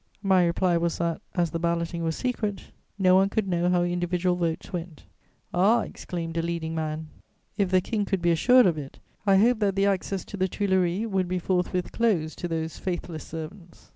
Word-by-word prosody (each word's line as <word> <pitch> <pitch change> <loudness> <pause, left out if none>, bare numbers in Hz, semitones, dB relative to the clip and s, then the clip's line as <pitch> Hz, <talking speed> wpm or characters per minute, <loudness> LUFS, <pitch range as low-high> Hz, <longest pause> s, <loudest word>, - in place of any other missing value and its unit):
My 190 -2 +4
reply 175 0 +2
was 170 0 -1
that, 170 -1 -1
as 170 -3 +1
the 165 - -2
balloting 170 0 -1
was 160 -1 -1
secret, 215 -6 -3 0.3
no 185 -2 +4
one 190 +1 +5
could 205 0 -1
know 175 -1 +1
how 180 -1 +3
individual 175 0 0
votes 170 +2 -3
went. 170 -3 -6 0.5
"'Ah,' 200 +7 +4
exclaimed 165 -2 -6
a - - +2
leading 165 -1 -3
man, 155 -1 -3 0.5
'if 200 -3 +1
the 185 0 +4
King 210 +2 -1
could 195 -1 -1
be 170 0 +2
assured 245 +9 +5
of 165 -4 +2
it, 140 -2 -9 0.3
I 195 -1 +6
hope 230 +3 +4
that 200 -3 +1
the 195 0 +2
access 195 -1 -1
to 205 - -8
the 185 0 +1
Tuileries 190 0 0
would 190 -4 0
be 180 +1 -1
forthwith 180 0 -1
closed 185 -10 0
to 175 - -2
those 160 -1 -3
faithless 175 -3 -4
servants.' 165 +2 -9
180 Hz, 200 wpm, -26 LUFS, 170-195 Hz, 0.5 s, I